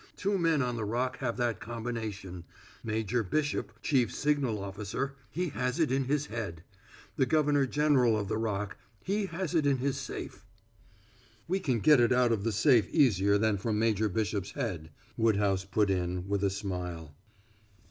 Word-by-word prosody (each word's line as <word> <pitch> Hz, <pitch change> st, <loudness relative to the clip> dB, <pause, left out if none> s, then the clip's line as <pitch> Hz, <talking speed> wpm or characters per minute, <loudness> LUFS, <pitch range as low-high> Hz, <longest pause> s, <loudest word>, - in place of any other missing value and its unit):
Two 200 Hz, 0 st, 0 dB
men 165 Hz, -5 st, +2 dB
on 125 Hz, -1 st, -2 dB
the 110 Hz, -, -2 dB
Rock 125 Hz, +4 st, -1 dB
have 120 Hz, -3 st, -2 dB
that 120 Hz, -2 st, 0 dB
combination: 110 Hz, -6 st, -5 dB, 0.4 s
Major 110 Hz, +1 st, -1 dB
Bishop, 120 Hz, 0 st, -1 dB
chief 130 Hz, -5 st, +2 dB
signal 145 Hz, -7 st, 0 dB
officer, 100 Hz, +7 st, -4 dB, 0.2 s
he 175 Hz, +7 st, -2 dB
has 125 Hz, 0 st, -2 dB
in 155 Hz, -5 st, +2 dB
it 135 Hz, -1 st, +1 dB
his 145 Hz, +1 st, +1 dB
head; 100 Hz, -, -5 dB, 0.5 s
the 130 Hz, -, +2 dB
governor 145 Hz, -1 st, +3 dB
general 130 Hz, -5 st, +3 dB
of 100 Hz, -2 st, -2 dB
the 110 Hz, -, -1 dB
Rock, 105 Hz, -3 st, -2 dB, 0.3 s
he 200 Hz, 0 st, -1 dB
has 180 Hz, -1 st, -4 dB
it 155 Hz, -4 st, +2 dB
in 140 Hz, -1 st, +3 dB
his 135 Hz, +1 st, -1 dB
safe." -, -, -6 dB, 1.0 s
"We 190 Hz, +3 st, 0 dB
can 125 Hz, -, 0 dB
get 150 Hz, +1 st, +6 dB
it 120 Hz, 0 st, +4 dB
out 125 Hz, -1 st, +4 dB
of 105 Hz, -3 st, 0 dB
the 115 Hz, -, 0 dB
safe 110 Hz, +2 st, +4 dB
easier 100 Hz, -, +3 dB
than 110 Hz, -1 st, +1 dB
from 105 Hz, +2 st, -1 dB
Major 110 Hz, -1 st, +2 dB
Bishop's 100 Hz, -1 st, -2 dB
head," 80 Hz, -3 st, -4 dB, 0.3 s
Woodhouse 100 Hz, -4 st, +2 dB
put 100 Hz, +1 st, +1 dB
in, 90 Hz, 0 st, -2 dB
with 100 Hz, 0 st, -1 dB
a 100 Hz, -, +3 dB
smile. 90 Hz, -5 st, -5 dB
115 Hz, 170 wpm, -30 LUFS, 100-135 Hz, 1.0 s, get